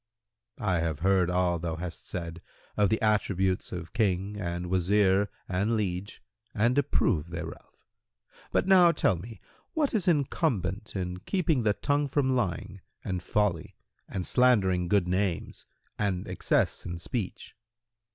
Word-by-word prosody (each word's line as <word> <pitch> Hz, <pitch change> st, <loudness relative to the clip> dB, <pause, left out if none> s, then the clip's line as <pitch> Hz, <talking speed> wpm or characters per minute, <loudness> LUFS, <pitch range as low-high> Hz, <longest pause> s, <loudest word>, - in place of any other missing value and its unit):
Q 110 Hz, -, -6 dB
"I 90 Hz, -4 st, +2 dB
have 80 Hz, -2 st, -2 dB
heard 95 Hz, -1 st, +3 dB
all 90 Hz, -1 st, +1 dB
thou 80 Hz, -1 st, -3 dB
hast 85 Hz, +1 st, -7 dB
said 85 Hz, -1 st, -5 dB, 0.3 s
of 105 Hz, -2 st, +3 dB
the 110 Hz, -, +1 dB
attributes 95 Hz, -3 st, +1 dB
of 90 Hz, -2 st, -6 dB
King 100 Hz, -3 st, 0 dB
and 90 Hz, -3 st, -3 dB
Wazir 95 Hz, +2 st, +3 dB, 0.2 s
and 100 Hz, +5 st, 0 dB
liege 95 Hz, -1 st, -3 dB, 0.3 s
and 115 Hz, +4 st, +2 dB
approve 85 Hz, -, +1 dB
thereof: 85 Hz, -1 st, -8 dB, 0.7 s
but -, -, +2 dB
now 180 Hz, -3 st, +7 dB
tell 150 Hz, -, +2 dB
me 105 Hz, +4 st, -9 dB, 0.3 s
what 300 Hz, -3 st, +1 dB
is 200 Hz, -5 st, 0 dB
incumbent 120 Hz, -, 0 dB
in 90 Hz, -1 st, -3 dB
keeping 160 Hz, -, 0 dB
the 105 Hz, -2 st, +2 dB
tongue 145 Hz, +5 st, 0 dB
from 130 Hz, -2 st, +1 dB
lying 95 Hz, -10 st, -2 dB, 0.2 s
and 90 Hz, -1 st, -3 dB
folly 100 Hz, -6 st, -1 dB, 0.3 s
and 90 Hz, -2 st, -3 dB
slandering 95 Hz, -8 st, +3 dB
good 95 Hz, -1 st, +2 dB
names 95 Hz, -1 st, -2 dB, 0.3 s
and 100 Hz, -4 st, -1 dB
excess -, -, 0 dB
in 85 Hz, 0 st, -5 dB
speech." 95 Hz, +3 st, -5 dB
95 Hz, 140 wpm, -28 LUFS, 90-115 Hz, 0.7 s, now